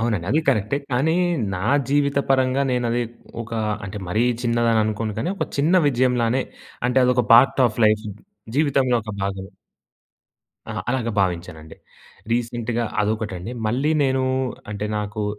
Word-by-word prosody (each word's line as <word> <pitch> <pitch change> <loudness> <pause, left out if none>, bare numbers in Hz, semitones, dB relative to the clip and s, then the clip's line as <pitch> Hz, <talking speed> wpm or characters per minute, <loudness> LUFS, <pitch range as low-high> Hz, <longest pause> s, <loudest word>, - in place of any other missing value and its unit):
అవునండి. 110 -7 -1
అదీ 150 +6 +3
కరెక్టే, 110 +5 +2 0.2
కానీ 150 +7 +2 0.4
నా 90 - -4 0.3
జీవిత 140 0 +2
పరంగా 130 0 +2
నేనది 120 -1 0 0.4
ఒకా 115 0 -5 0.3
అంటే, 105 +1 -6
మరీ 105 +6 +1 0.2
చిన్నదననుకోను, 115 -2 +1
కానీ 170 - -1
ఒక - - -2
చిన్న 155 +6 +2
విజయంలానే 125 -1 +1 0.5
అంటే, 125 - -2
అదొక 125 0 +2
పార్ట్ 130 +3 +5
ఆఫ్ 115 0 -4
లైఫ్, 110 +1 +2 0.5
జీవితంలో 135 -4 +2
ఒక 105 -1 -6
భాగమే. 95 0 -4 1.2
ఆ! - - -3 0.2
అలాగా 125 -3 -1
భావించానండి. 85 -4 -3 0.6
రీసెంట్‍గా 120 0 -1 0.2
అదొకటండి. 105 -1 -3
మళ్ళీ 130 +8 0
నేను 130 -1 +1 0.5
అంటే, 105 0 -3
నాకూ 105 0 -3
115 Hz, 130 wpm, -22 LUFS, 105-130 Hz, 1.2 s, పార్ట్